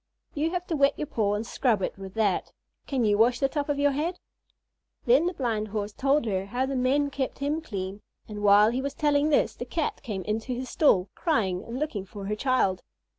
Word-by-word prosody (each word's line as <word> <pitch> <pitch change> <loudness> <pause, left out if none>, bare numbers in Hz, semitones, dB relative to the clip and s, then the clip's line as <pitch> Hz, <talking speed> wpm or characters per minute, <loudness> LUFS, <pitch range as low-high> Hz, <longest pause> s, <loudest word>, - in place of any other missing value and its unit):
You 305 +2 0
have 355 +1 -3
to 335 - -2
wet 280 -1 +3
your - - -2
paw 210 -7 0
and 215 +2 -3
scrub 220 -4 +1
it - - -2
with 195 -1 -10
that. 210 -4 0 0.4
Can 260 -4 0
you 205 -1 +2
wash 240 +2 +4
the 275 - +3
top 290 +1 -3
of 290 - 0
your 285 0 +3
head?" 320 +6 -2 0.9
Then 475 -8 +4
the 360 - -1
Blind 225 -6 -1
Horse 210 0 -4
told 275 +2 +1
her 195 -3 -1
how 245 +5 -1
the 270 0 -3
men 275 +3 +1
kept 275 -2 -3
him 290 +3 -1
clean; 195 -7 -5 0.3
and 210 -1 -7
while 205 +1 +6
he 255 +2 -1
was 280 +1 -4
telling 295 0 +2
this 295 - +2
the - - -6
Cat 305 +6 -3
came 195 -5 -4
into 220 +5 -2
his 255 0 -5
stall, 195 - +3
crying 200 - 0
and 230 +2 -6
looking 250 -10 -3
for 200 +1 -8
her 210 +2 -1
child. 215 -7 +1
250 Hz, 225 wpm, -27 LUFS, 205-285 Hz, 0.9 s, while